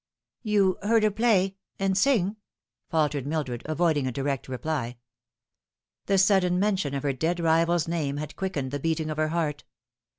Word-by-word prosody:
" - - -66
You 205 -4 +2
heard 220 +2 +3
her 215 - +3
play 200 -3 +2 0.2
and 195 -1 0
sing 210 -3 +2 0.2
?" - - -60
faltered 150 -4 0
Mildred, 140 -6 -2
avoiding 155 -3 +1
a - - -1
direct 135 +1 -2
reply. 130 -2 -3 1.1
The 195 - +3
sudden 190 -2 +3
mention 190 -8 0
of 140 - -3
her 140 -1 0
dead 165 +6 -1
rival's 165 0 +2
name 150 -4 -2
had 150 0 -6
quickened 155 -9 -3
the 145 - -3
beating 160 +1 -1
of 155 - -5
her 155 0 +1
heart. 155 -3 -2
165 Hz, 170 wpm, -26 LUFS, 145-190 Hz, 1.1 s, heard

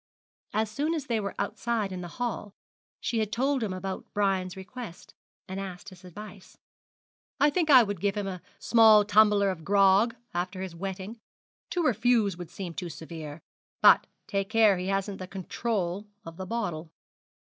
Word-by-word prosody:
As 215 0 0
soon 300 +8 -1
as 300 -4 -3
they 230 -3 0
were 200 -1 -4
outside 225 -4 -1
in 185 -1 -5
the 175 - -6
hall 220 -4 -3 0.4
she 225 -2 0
told 265 +5 0
him 215 -4 -1
about 190 +1 -4
Brian's 190 -2 0
request, 195 0 -9 0.3
and 190 +1 -5
asked 190 -2 -7
his 185 -1 -16
advice. 195 +1 -11 0.8
'I 290 +2 +5
think 330 -1 0
I 260 -4 +9
would 205 -5 -4
give 200 0 0
him 205 - -1
a 185 -2 -5 0.2
small 220 -3 +6
tumbler 205 -1 +5
of 165 -4 -7
grog 200 +4 +4 0.2
after 185 +2 -3
his 185 -3 -7
wetting. 195 +5 -6 0.5
To 350 - -1
refuse 225 - +2
would 175 -2 -8
seem 175 -1 -6
too 175 0 -5
severe. 160 -2 -8 0.4
But - - +6 0.2
take 195 -1 -2
care 220 -4 +4
he 180 - -3
hasn't 195 0 -1
the 185 - -6
control 195 0 -3 0.2
of 165 0 -9
the 190 0 -6
bottle.' 175 -8 -3
200 Hz, 170 wpm, -28 LUFS, 185-225 Hz, 0.8 s, I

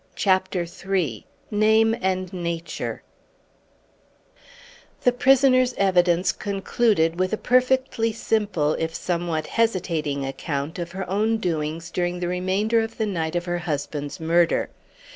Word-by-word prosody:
CHAPTER 185 -2 +1
III 170 - -3 0.2
NAME 220 +1 +4
AND 185 0 -1
NATURE 170 -2 -4 2.0
The 250 - +5
prisoner's 255 0 +4
evidence 180 -2 +3
concluded 195 -4 0
with 185 +2 0
a - - +1
perfectly 255 -2 +2
simple 205 -9 0
if 165 0 -2
somewhat 170 -3 -2
hesitating 165 -11 -1
account 140 +4 -4
of 170 0 -5
her 190 -1 -4
own 215 +4 +1
doings 165 -3 -3
during 175 0 -1
the 175 - -2
remainder 190 +5 +1
of 225 0 -5
the 220 - 0
night 170 -5 -2
of 175 0 -1
her 175 -1 -2
husband's 145 0 -4
murder. 170 +1 +2
180 Hz, 125 wpm, -24 LUFS, 165-215 Hz, 2.0 s, The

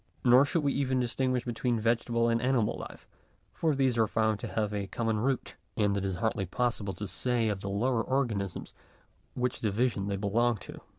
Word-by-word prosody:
Nor 125 +3 +7
should 155 +2 0
we 140 -1 +1
even 130 -2 0
distinguish 125 0 0
between 120 0 -1
vegetable 115 +1 +1
and 115 0 +1
animal 125 -4 +1
life; - - -15 0.5
for 160 -3 +1
these 130 -3 +2
are 110 - +4
found 110 -1 +1
to - - -5
have 105 -1 -1
a 100 -1 -2
common 115 -1 -1
root, 130 +2 -1 0.2
and 105 -2 +2
it 100 - -1
is 95 -2 -1
hardly 100 -1 -1
possible 105 -2 -1
to 105 +2 -5
say 115 +3 0
of 100 -2 -2
the 100 - -4
lowest 115 +4 0
organisms 110 -9 -1 0.6
which 125 0 -1
division 105 -1 0
they 100 - -1
belong 110 +4 +1
to. - - -10
115 Hz, 190 wpm, -30 LUFS, 105-125 Hz, 0.6 s, Nor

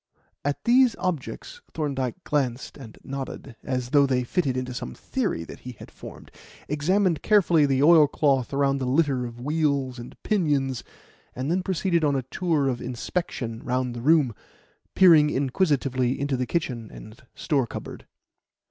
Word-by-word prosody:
At 145 0 -2
these 245 -1 +4
objects 185 - -4
Thorndyke 140 0 -3
glanced 135 -4 -2
and 120 -6 -12
nodded, 135 -2 -7
as 125 -1 -3
though 140 -1 +5
they 125 -1 +1
fitted 130 -1 -1
into 125 0 -3
some 125 -1 -6
theory 215 - -2
that - - -11
he 125 - -9
had - - -13
formed; - - -12 0.4
examined 170 +4 +1
carefully 175 -8 +4
the 135 0 +2
oilcloth 145 -5 +4
around 140 0 +1
the 130 - -2
litter 135 -3 +1
of 120 0 -11
wheels 140 -3 0
and 120 - -10
pinions, 145 - 0 0.5
and 130 +5 -2
then 185 +2 +1
proceeded 180 -2 0
on 145 -2 +2
a 135 - -1
tour 155 +1 0
of 125 -2 -2
inspection 125 -2 -4
round 125 0 -1
the 120 - -6
room, 145 -3 +3 0.6
peering 165 -5 +7
inquisitively 135 -3 0
into 140 -1 -1
the 125 -1 -2
kitchen 125 -9 -3
and 110 +1 -12
store 135 -5 0
cupboard. - - -8
140 Hz, 155 wpm, -25 LUFS, 125-160 Hz, 0.6 s, peering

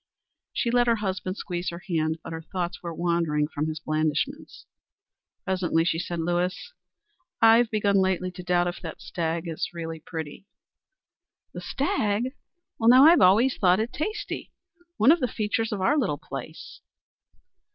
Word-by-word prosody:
She 235 - -1
let 245 0 +3
her 235 - +4
husband 190 -2 -3
squeeze 175 -1 -3
her 170 +1 -8
hand, 160 -3 0
but - - -7
her 160 - -5
thoughts 175 +1 -4
were 170 - -5
wandering 165 -3 0
from 155 0 -3
his 155 0 -4
blandishments. 155 -1 -2 0.8
Presently 180 -3 0
she 165 -1 0
said: 175 0 -4
"Lewis, 175 - -2 0.7
I've 225 +1 +6
begun 205 -2 +1
lately 185 -1 +1
to 180 0 -9
doubt 175 0 +1
if 175 - -5
that 165 -4 -7
stag 165 0 -3
is 165 -2 -3
really 165 -1 -5
pretty." 160 +3 -7 1.1
"The - - -6
stag? 240 -2 -1 0.5
Well, 225 0 +4
now, 255 +3 +8
I've 335 +2 +7
always 220 +8 +5
thought 185 0 +4
it 225 +2 -2
tasty 420 +7 -4 0.5
one 245 +7 +6
of 340 - +4
the 250 - 0
features 220 0 -2
of 205 -3 -3
our 285 +10 +3
little 200 - 0
place." - - -9
185 Hz, 160 wpm, -26 LUFS, 165-225 Hz, 1.1 s, now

